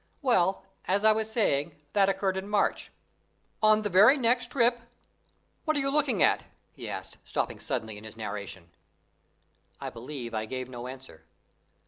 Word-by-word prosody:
Well, 195 -7 +2 0.2
as 200 +2 +1
I 220 - +8
was 220 0 -1
saying, 150 - +1 0.2
that 195 -1 +4
occurred 195 -1 0
in 190 +1 -4
March. 210 -1 0 0.7
On 215 0 +5
the - - +1
very 210 +10 +7
next 245 -1 +2
trip 240 -2 +2 0.8
What 310 -2 +1
are - - +2
you 275 0 0
looking 275 - +2
at?" - - +3 0.3
he - - -8
asked, - - -7
stopping - - -3
suddenly 110 -1 -4
in - - -15
his 110 0 -10
narration. 100 -5 -6 1.1
I - - -5
believe 120 -1 -7
I 110 0 -2
gave 130 +2 -5
no 120 -1 -7
answer. 130 -9 -10
190 Hz, 160 wpm, -28 LUFS, -, 1.1 s, I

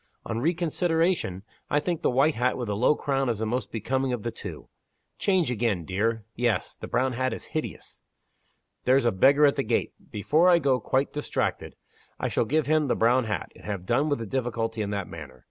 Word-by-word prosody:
On 110 - -2
reconsideration, 165 - 0 0.3
I 145 - +3
think 170 +2 -2
the - - +2
white 135 +5 +3
hat 125 +1 0
with 120 -4 -4
the 100 - 0
low 125 +8 +3
crown 135 -3 0
is 115 - 0
the 110 - -2
most 125 +4 -2
becoming 130 +4 -1
of 115 -4 -4
the 115 - -2
two. - - -8 0.5
Change 185 -8 +2
again, 110 -7 0
dear. 110 +4 -1
Yes! 120 -2 0
the - - -8
brown 130 0 +1
hat 130 +1 -1
is - - -6
hideous. 155 - -5 0.8
There's 130 +1 +4
a 120 - +4
beggar 140 +9 +5
at 140 - +3
the - - +1
gate. - - 0 0.2
Before 155 - +3
I 175 - +7
go 135 -5 +2
quite 135 +2 0
distracted, 150 - -2 0.4
I - - -1
shall - - +1
give 150 +5 +1
him 155 +1 +2
the - - +1
brown 120 +2 +3
hat, 105 -5 -3
and - - -16
have 100 -4 -4
done 145 +10 +1
with 145 - +1
the 115 - -5
difficulty 115 -1 -2
in 100 - -2
that 100 -2 -3
manner. 75 -6 -10
125 Hz, 210 wpm, -26 LUFS, 110-145 Hz, 0.8 s, I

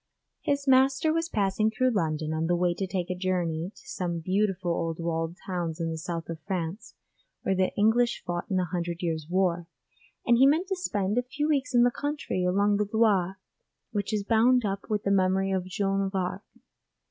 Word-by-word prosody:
His 280 0 -1
master 270 +4 +4
was 330 +1 -1
passing 205 +1 +1
through 255 +3 +1
London 155 -6 -1
on 160 +1 -1
the 175 - +2
way 175 0 +1
to 190 +2 -3
take 185 -1 -2
a - - -2
journey 180 -2 -1
to - - -16
some 175 -3 -3
beautiful 185 +1 0
old 165 -1 -2
walled 165 0 -2
towns 175 -3 -3
in 165 -1 -1
the 160 - -4
south 165 0 -4
of 165 -1 -6
France 180 +2 -4 0.5
where 195 - +1
the 185 0 +1
English 235 +3 +2
fought 175 +4 -3
in 190 - 0
the 180 - +1
Hundred 170 0 -4
Years 160 -3 -2
War, 175 -2 +1 0.6
and 240 0 +4
he 265 - +7
meant 325 +7 +2
to 385 - 0
spend 210 - -1
a - - +2
few 295 +4 -3
weeks 285 -4 0
in 240 - +6
the 245 - +4
country 290 -10 -2
along 200 +3 +2
the 210 -1 -1
Loire 195 -5 +2 0.5
which 205 0 -2
is 210 -2 0
bound 230 +3 +3
up 195 0 -3
with 210 -1 0
the 200 - +1
memory 190 0 +2
of 190 -1 -1
Joan 195 +1 -1
of 195 - -7
Arc. 185 +1 -2
190 Hz, 205 wpm, -27 LUFS, 175-225 Hz, 0.6 s, he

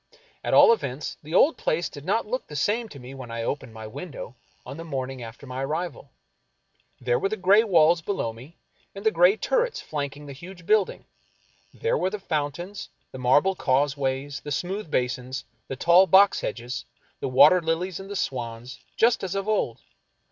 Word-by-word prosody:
At - - +1
all - - +8
events, 140 - -4
the 155 +3 -6
old 300 +11 +5
place 165 +3 0
did 145 - -11
not 215 +5 +1
look 255 +5 -4
the 150 - -9
same 215 +10 0
to 140 - -11
me 130 0 -10
when 130 -3 -9
I 115 0 -4
opened 135 -1 -3
my 110 0 -8
window 185 - -8 0.3
on - - -8
the 165 - -6
morn 135 -5 -4
ing 130 -2 -9
after 115 +4 -10
my 130 0 -4
arrival. 155 0 -4 0.9
There 120 -1 +1
were 195 - 0
the 215 - -3
gray 195 +4 +5
walls 170 -5 +4
below 160 - -2
me 130 +9 -14 0.4
and 200 +2 -9
the 220 - +5
gray 180 +4 +5
turrets - - 0
flanking 145 -1 -5
the 140 - -8
huge 175 +5 -12
building; 210 -1 +1 0.7
there 470 +2 -1
w^ere 185 - +1
the 210 - -4
fountains, 175 +2 -4 0.2
the 130 - -8
marble 145 +10 +4
causeways, 140 -2 0
the 145 - -8
smooth 185 +5 -3
basins, 125 0 -2 0.2
the 135 - -4
tall 175 +7 +5
box 195 +1 +5
hedges, 120 +2 -4 0.4
the - - -3
water 145 +8 +7
lilies 165 +3 -2
and 195 0 -9
the 205 - -5
swans, 120 -5 -4 0.2
just 230 -1 +3
as 190 0 -3
of 195 +1 -2
old. 200 - 0
155 Hz, 190 wpm, -25 LUFS, 130-195 Hz, 0.9 s, all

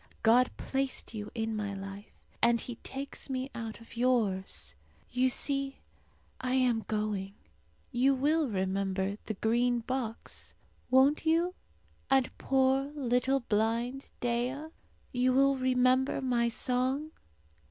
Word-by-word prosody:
God 245 +3 +5
placed 270 -3 -2
you 210 -1 -5
in 225 -1 -1
my 205 -2 -3
life, 195 +1 -9 0.2
and 235 0 +4
He 240 -1 -6
takes 275 +1 -7
me 260 0 -3
out 225 -1 -6
of 230 0 -14
yours. 225 - 0 0.4
You 255 +1 +3
see, 275 +1 0 0.6
I 255 0 -1
am 245 -4 +2
going. 210 -2 -2 0.6
You 270 +3 +3
will 300 +3 +2
remember 190 0 -1
the 220 - -2
Green 240 +3 +2
Box, 240 -2 -5 0.3
won't 265 +4 +5
you, 335 +3 +3 0.6
and 265 -2 +3
poor 265 0 +3
blind 280 -4 -5
little 240 -2 +2 0.3
Dea? 250 +6 -1 0.4
You 255 0 +2
will 275 +1 +4
remember 255 +1 +2
my 245 -3 +1
song? 255 +5 0
250 Hz, 120 wpm, -31 LUFS, 225-265 Hz, 0.6 s, God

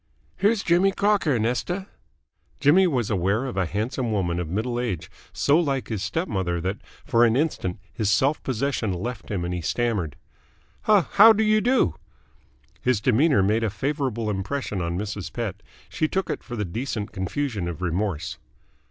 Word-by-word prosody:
"Here's 210 0 +2
Jimmy 180 +3 +4
Crocker, 200 - +2
Nesta." 125 - -1 0.7
Jimmy 170 +7 +5
was 125 - 0
aware 100 +6 +1
of 130 - -4
a 95 -3 0
handsome 115 - -2
woman 90 -4 0
of 85 -3 -3
middle 115 +6 -1
age, 90 -9 -3 0.2
so 145 +3 +3
like 140 -6 -1
his 110 -4 -2
step 165 - -2
mother 90 - -1
that 95 +4 -3 0.3
for 120 -5 +3
an 115 -1 +4
instant 130 - -1 0.2
his 110 -4 -1
self 135 +9 +2
possession 130 -4 -1
left 110 +5 -5
him 95 -4 -2
and 90 - -3
he 90 - -3
stammered. 95 - -1 0.7
"How 210 -2 +6
how 220 +6 +7
do 220 +1 +1
you 215 0 +3
do?" 245 - +3 0.9
His 125 -4 +2
demeanour 125 0 +3
made 110 +4 +2
a 110 - +1
favourable 120 -1 -2
impression 100 +1 -3
on 85 +1 -2
Mrs. 100 -1 -4
Pett. 105 -5 -4 0.3
She 155 - -1
took 190 +4 -1
it - - -4
for 120 - -7
the 105 -2 -2
decent 110 +3 -4
confusion 100 0 -2
of 85 +1 -5
remorse. 90 -2 -2
115 Hz, 170 wpm, -24 LUFS, 95-145 Hz, 0.9 s, how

